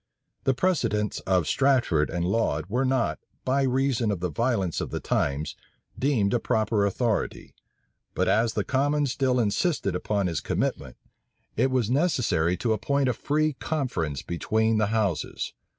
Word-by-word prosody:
The 135 - +3
precedents 130 - 0
of 90 -3 +2
Strafford 125 - +2
and 85 0 -2
Laud 90 -7 0
were 125 +7 0
not, 130 -2 0 0.3
by 135 +2 +2
reason 130 -3 +1
of 100 -4 -1
the 90 -1 -2
violence 105 - 0
of - - -4
the - - -3
times, 70 +2 -1 0.4
deemed 125 -8 +2
a 120 - +3
proper 110 -2 +1
authority; 110 +2 -2 0.6
but - - +1
as 115 +1 +2
the - - 0
commons 145 0 +1
still 130 -1 +1
insisted 120 - 0
upon 100 -2 -1
his 85 -6 -1
commitment, - - -2 0.6
it 130 +4 +2
was 125 -4 0
necessary 120 - +1
to 115 -3 +1
appoint 135 +5 0
a - - +1
free 155 +5 0
conference 105 - -2
between 110 +6 0
the 105 - +2
houses. 105 -7 -1
115 Hz, 150 wpm, -26 LUFS, 95-135 Hz, 0.6 s, The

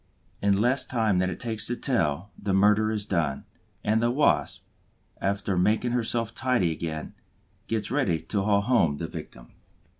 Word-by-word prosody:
In 100 -1 +3
less 125 +5 +2
time 110 -6 +1
than 95 0 +1
it 90 - -6
takes 110 -2 -2
to 120 - -1
tell, 95 - 0
the 100 -2 -1
murder 105 +2 +4
is 105 -2 -1
done; 85 -9 -1 0.4
and 110 +2 +2
the 120 - +2
Wasp, 145 +5 +1 0.6
after 100 0 -1
making 110 +6 +2
herself 115 -1 0
tidy 120 -10 +1
again, 80 -1 -5 0.5
gets 110 0 -2
ready 125 - +1
to 100 +4 -2
haul 100 0 +2
home 100 - +2
the - - -4
victim. - - -10
105 Hz, 160 wpm, -26 LUFS, 90-115 Hz, 0.6 s, murder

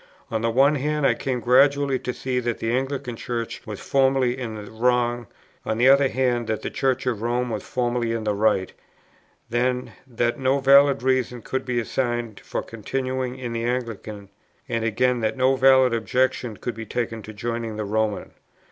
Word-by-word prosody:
On 110 - -1
the 115 - +1
one 135 +5 +4
hand 150 +1 -1
I - - +5
came 130 -2 -2
gradually 140 +2 +4
to 125 - -3
see 125 0 -2
that 120 -2 -2
the 115 - -2
Anglican 130 0 -2
Church 115 0 -4
was 105 -2 -6
formally 135 -2 +2
in 120 -4 -5
the 105 -1 -9
wrong, 120 0 +1 0.4
on 110 - -2
the 125 +3 +5
other 140 0 +6
that 120 -4 0
the - - -3
Church 130 0 0
of 120 -5 -1
Rome 120 +1 -1
was 105 -2 -3
formally 120 0 -1
in 115 -1 -2
the 105 -1 0
right; 100 -2 +1 0.8
then, 125 +1 0 0.2
that 120 +1 -1
no 130 +1 +2
valid 140 -1 +5
reasons 130 -3 0
could 130 - -3
be 125 -2 0
assigned 120 -2 -2
for - - -4
continuing 130 +3 -3
in 120 -2 -5
the 115 0 -2
Anglican, 115 -5 -4 0.4
and 115 -3 -2
again 125 +3 +1
that 110 +3 -1
no 130 +1 +3
valid 130 -1 +5
objections 125 -1 0
could 120 - -3
be 110 0 -8
taken 115 -1 -3
to 110 - -9
joining 115 +1 -4
the 105 - -3
Roman. 105 -1 -1
120 Hz, 185 wpm, -24 LUFS, 115-130 Hz, 0.8 s, other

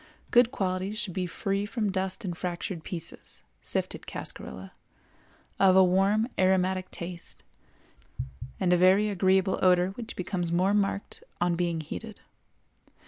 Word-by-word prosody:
Good 245 -1 +6
qualities 190 -3 -2
should 215 -5 -3
be 180 0 -1
free 195 +3 -1
from 210 -1 -1
dust 190 0 -2
and 175 -2 -3
fractured 175 0 -4
pieces 165 -2 -7 0.2
(sifted - - -3
cascarilla), 65 +10 -5 0.9
of 190 -1 +6
a 190 - +8
warm 195 +5 +3
aromatic 185 0 +2
taste, 170 0 -8 1.2
and 180 -2 +3
a - - +5
very 190 +4 +5
agreeable 190 0 +2
odor 180 0 +4
which 225 +4 -7
becomes 175 -2 -2
more 185 +4 +3
marked 200 -1 0 0.2
on 175 -1 +2
being 170 -2 0
heated. 215 +8 -7
185 Hz, 135 wpm, -28 LUFS, 175-200 Hz, 1.2 s, a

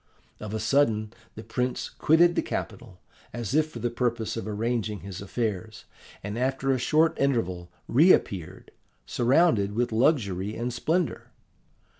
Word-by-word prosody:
Of 105 0 -5
a - - -2
sudden 110 -3 +1 0.2
the 110 - -8
prince 125 +3 -2
quitted 170 +3 +3
the - - +1
capital, 90 - -6 0.3
as 120 -2 -4
if 155 +1 +2
for - - -9
the 120 - -2
purpose 120 -2 -1
of 115 -2 -5
arranging 110 -2 -2
his 95 +1 -8
affairs, 110 0 -4 0.4
and 105 +3 -4
after 135 +1 0
a 130 - +1
short 155 +6 +2
interval 95 -11 0 0.2
reappeared, 115 - +2 0.3
surrounded 120 - +2
with 120 +1 0
luxury 110 - +1
and 120 +1 -3
splendour. 165 +8 -1
115 Hz, 140 wpm, -26 LUFS, 105-135 Hz, 0.4 s, quitted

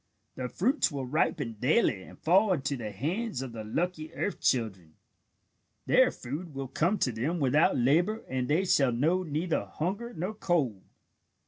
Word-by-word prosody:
The 125 -1 -4
fruits 245 - +1
will 140 -2 -4
ripen 130 -4 -1
daily 125 - +2
and - - -13
fall 190 +5 +3
into 140 -3 -1
the 115 -4 -5
hands 155 - -2
of 130 - -6
the 110 -1 -6
lucky 160 +7 -2
earth 205 - -3
children. 95 - 0 0.9
Their - - +5
food 150 +5 -7
will 135 -1 -4
come 175 +10 +1
to 125 - +1
them 135 +10 -2
without 145 +2 +3
labour 170 - +2
and 130 -1 -2
they 165 +7 +2
shall 135 -8 +3
know 155 +10 +1
neither 160 0 -1
hunger 200 +9 -3
nor 185 +3 -4
cold." 150 - 0
150 Hz, 160 wpm, -29 LUFS, 125-180 Hz, 0.9 s, Their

